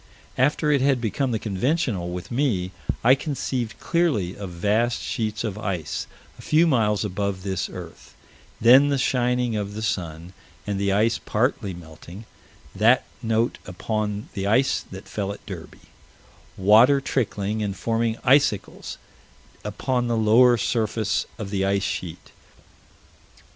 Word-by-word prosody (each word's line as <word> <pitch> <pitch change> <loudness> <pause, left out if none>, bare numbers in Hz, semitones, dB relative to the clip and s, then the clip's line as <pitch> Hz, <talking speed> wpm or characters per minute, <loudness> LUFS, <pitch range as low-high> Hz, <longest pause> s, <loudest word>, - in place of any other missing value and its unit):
After 150 +3 +2
it 140 -3 +3
had 135 -1 +3
become 120 +4 -1
the 115 - 0
conventional 110 - -1
with 90 +4 -6
me, 115 -9 0 0.3
I 125 +3 +7
conceived 130 -5 -3
clearly 145 - 0
of 100 -2 -7
vast 105 +7 0
sheets 110 -2 -3
of 105 -2 -4
ice, 90 -8 -3 0.3
a - - -9
few 160 +2 +3
miles 110 -9 +2
above 100 -1 -3
this 95 -3 -2
earth - - -11 0.4
then 130 +5 +7
the 140 - +1
shining 125 -2 +1
of 100 -1 -3
the 110 - -4
sun, 85 -3 -3 0.3
and 100 -1 -2
the 100 0 +1
ice 110 +3 +2
partly 105 -4 -1
melting 85 +5 -12 0.5
that 115 +6 +4 0.2
note 115 0 0
upon 105 +2 -3
the 100 -1 -3
ice 130 +6 +2
that 95 +1 -10
fell 100 -2 -3
at 100 - -10
Derby - - -10 0.7
water 110 +8 +6
trickling 110 -5 -2
and 100 -2 -3
forming 115 0 0
icicles 130 -6 +1 0.7
upon 125 -2 -1
the 115 -1 0
lower 120 +3 +5
surface 110 -1 -1
of 105 -4 -6
the 95 -2 0
ice 100 0 +1
sheet. 90 -3 -5
110 Hz, 140 wpm, -24 LUFS, 100-125 Hz, 0.7 s, I